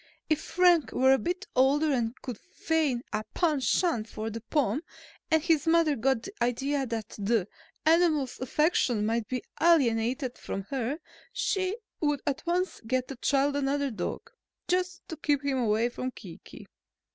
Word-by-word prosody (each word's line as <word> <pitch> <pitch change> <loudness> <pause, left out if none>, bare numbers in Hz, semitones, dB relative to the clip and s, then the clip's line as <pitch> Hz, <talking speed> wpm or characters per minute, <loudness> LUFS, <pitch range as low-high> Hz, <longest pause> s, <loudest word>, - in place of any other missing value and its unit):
If 310 0 +2
Frank 350 -3 +3
were 265 +1 +5
a 270 - +3
bit 360 +4 -3
older 285 +4 +4
and 235 -1 -1
could 245 -5 -6
feign 320 -8 -1
a 215 - -1
penchant 300 -6 +1
for 220 +1 -4
the 230 +1 -6
Pom 265 +1 0 0.5
and 320 -1 +3
his 325 -3 +2
mother 325 -2 +4
got 245 -1 +1
the 395 - -8
idea 270 +3 0
that 225 -2 -4
the 205 -1 +1 0.4
animal's 315 -5 +3
affection 255 -5 +1
might 225 0 0
be 250 0 -3 0.2
alienated 255 -5 +2
from 195 - -4
her, 265 +1 -1 0.3
she 395 -5 -1 0.2
would 295 -3 0
at 285 +2 -2
once 360 +2 0
get 255 +1 0
the 270 - -5
child 280 +2 +1
another 280 0 0
dog, 220 - -5 0.4
just 360 0 -1
to 320 - -6
keep 290 -2 0
him 270 -2 +1
away 225 0 +2
from 255 +1 -4
Kiki." 185 -9 -12
275 Hz, 155 wpm, -28 LUFS, 240-320 Hz, 0.5 s, were